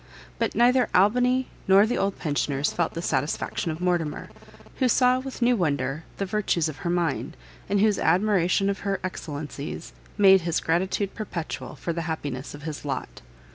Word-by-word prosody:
But - - 0
neither 245 +1 +4
Albany 250 +6 +3 0.2
nor 195 +2 +7
the 240 - -1
old 195 0 0
pensioners 145 -2 -1
felt 170 -2 -1
the 165 - -4
satisfaction 145 +4 -1
of 155 0 -4
Mortimer, 175 -4 -1 0.5
who 260 - +2
saw 250 +2 +4
with 260 -1 -5
new 245 +1 +4
wonder 145 - -1
the 200 - -1
virtues 190 -5 0
of 155 -3 -6
her 170 - -4
mind, 170 -4 -1 0.3
and 200 0 +2
whose 210 -1 +3
admiration 185 +1 +2
of 200 0 -1
her 195 -1 -2
excellencies, 150 -3 -6 0.2
made 195 -2 +7
his 170 -1 0
gratitude 190 +4 0
perpetual 185 -7 -5
for 170 - -3
the 170 - -3
happiness 145 -4 -4
of 145 - -12
his 155 -2 -5
lot. 145 -2 -5
180 Hz, 170 wpm, -25 LUFS, 155-205 Hz, 0.5 s, nor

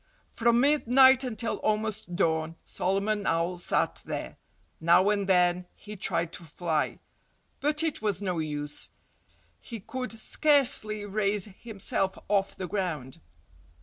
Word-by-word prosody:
From 235 +1 +3
midnight 265 -2 +5
until 230 -2 -3
almost 215 -4 -2
dawn 160 -2 0
Solomon 200 +2 -1
Owl 170 +2 0
sat - - 0
there. - - -6 0.4
Now 175 +5 +4
and 200 -2 -1
then 180 -1 +3
he 210 0 -10
tried 170 -3 -1
to 175 - -8
fly. 160 -1 -2 0.6
But 300 +2 +2
it 320 -7 -1
was 205 -4 -1
no 185 -4 -2
use. 150 -1 -1 0.7
He 230 - -8
could 255 +5 -6
scarcely 225 -4 +2
raise 205 -1 0
himself 195 -3 -2
off 200 -1 +1
the 185 - -5
ground. 165 -10 -4
200 Hz, 125 wpm, -28 LUFS, 175-225 Hz, 0.7 s, midnight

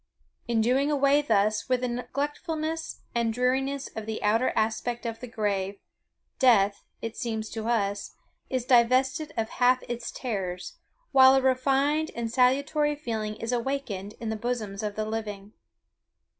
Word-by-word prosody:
In 235 -2 +2
doing 260 +5 +2
away 285 0 +4
thus 215 -3 +1
with 255 -1 +2
the 250 - 0
neglectfulness 295 +6 -3
and 235 -1 +1
dreariness 265 +3 0
of 220 -1 -5
the 220 0 -4
outer 225 +4 +3
aspect 230 +2 -1
of 225 -1 -4
the 250 - -7
grave, 200 -3 -1 0.6
death, 205 -6 +4 0.2
it 230 -1 -4
seems 220 -2 -3
to 220 -1 -4
us, 205 -3 -1 0.3
is 255 -2 -1
divested 255 +5 +3
of 220 -1 -1
half 250 0 +3
its 240 -1 -4
terrors, 190 -7 -4 0.3
while 265 -1 +8
a 270 - +4
refined 275 +4 +2
and 230 -1 -3
salutary 280 +4 +2
feeling 220 -7 -3
is 230 +2 -4
awakened 235 -5 -3
in 230 -2 -4
the 220 - -1
bosoms 215 -4 -3
of 210 -1 -3
the 215 - -2
living. 210 -2 -5
240 Hz, 150 wpm, -27 LUFS, 220-265 Hz, 0.6 s, while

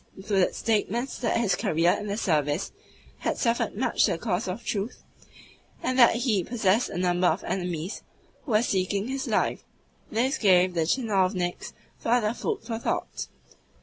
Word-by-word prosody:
included 195 -1 +1
statements 230 +3 -1
that 230 -2 +1
his 200 -6 +2
career 165 0 +2
in 210 +3 -2
the 200 +1 -2
service 155 -2 0 0.5
had - - -1
suffered 230 -3 0
much 260 - +2
to - - +3
the - - -3
cause 190 0 -2
of 185 +6 -5
Truth, 205 +3 -3 0.8
and 255 +1 0
that 240 -2 +7
he 230 -6 +1
possessed 220 +1 +1
a - - -5
number 180 0 +2
of 170 +3 0
enemies 180 -1 -3 0.4
who 245 - -3
were 215 +2 +4
seeking 200 +1 0
his 270 0 -3
life. - - 0 0.5
This 255 +6 0
gave 185 -3 +4
the 165 -2 0
tchinovniks 185 -5 0 0.3
further 230 -2 +1
food 240 - -3
for 225 -1 -4
thought. - - -3
205 Hz, 160 wpm, -26 LUFS, 180-230 Hz, 0.8 s, that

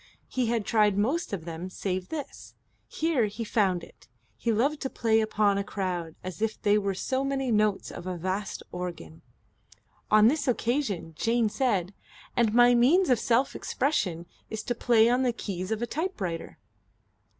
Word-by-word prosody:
He 255 -2 -1
had 230 -2 0
tried 210 -3 +3
most 270 - 0
of 180 -5 -4
them 170 +2 -6
save 185 -1 -3
this. 300 -4 -7 0.3
Here 310 -7 +1
he 210 +3 -5
had 220 - -10
found 190 -6 +2
it. - - -16 0.3
He 230 - -1
loved 275 +7 +1
to 265 - -2
play 225 -3 +2
upon 210 -2 +2
a - - -1
crowd 180 -5 -3
as 185 +2 -7
if 220 -1 -1
they 205 0 +3
were 200 -1 -1
so 260 +7 -1
many 270 -2 -1
notes 210 -2 +1
of 175 - -8
a 180 -1 -3
vast 190 +4 -3
organ. 170 - -6 0.9
On 215 0 +6
this 295 +3 +1
occasion 235 - -1
Jane 230 +4 +1
said: 205 -7 0 0.4
"And 235 -3 +3
my 240 +2 +6
means 270 +8 +4
of 245 - +4
self 245 +3 +1
expression 185 - -1 0.2
is 220 -1 -5
to 245 - -1
play 230 -1 +4
on 245 +2 +3
the 255 -2 +2
keys 185 -5 -5
of 220 +1 -1
a - - +2
typewriter." 230 - -4
220 Hz, 175 wpm, -27 LUFS, 185-245 Hz, 0.9 s, On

